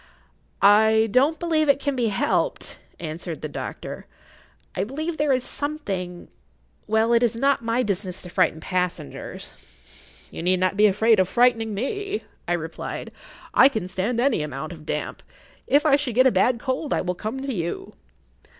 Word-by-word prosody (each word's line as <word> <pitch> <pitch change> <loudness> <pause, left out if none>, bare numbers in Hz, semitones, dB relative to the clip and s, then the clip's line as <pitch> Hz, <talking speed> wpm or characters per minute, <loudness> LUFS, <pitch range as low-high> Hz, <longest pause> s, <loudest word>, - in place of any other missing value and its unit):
"I 220 +2 +5
don't 280 +7 +3
believe 315 -3 +1
it 280 0 +4
can 285 -1 -1
be 240 -3 +1
helped," 200 -2 -1 0.2
answered 165 0 -6
the - - -1
doctor. 145 - -7 0.7
"I 185 - 0
believe 310 +9 -4
there 295 -1 +2
is 255 -1 +2
something—well, 180 - -3
it 235 - +4
is 235 -2 +2
not 275 +2 +2
my 230 +2 +1
business 190 -3 -3
to 180 - -8
frighten 160 - +1
passengers." 180 - -4 0.8
"You - - -6
need 180 +2 +2
not 185 +1 +1
be 210 +1 +6
afraid 215 +2 +3
of 185 -1 +2
frightening 230 -3 +2
me," 400 - -3 0.2
I - - +1
replied. - - -5 0.4
"I 270 - +7
can 220 -9 -3
stand 195 +6 -2
any 245 - +2
amount 150 +2 -5
of 155 -2 -13
damp. - - -3 0.5
If 290 +3 +3
I 280 -2 +5
should 270 -6 -3
get 255 +1 +5
a 260 - +6
bad 245 0 +3
cold 260 +4 -1
I - - 0
will 180 0 -2
come 215 +8 -5
to 270 0 -3
you." 185 - -4
220 Hz, 170 wpm, -24 LUFS, 180-270 Hz, 0.8 s, I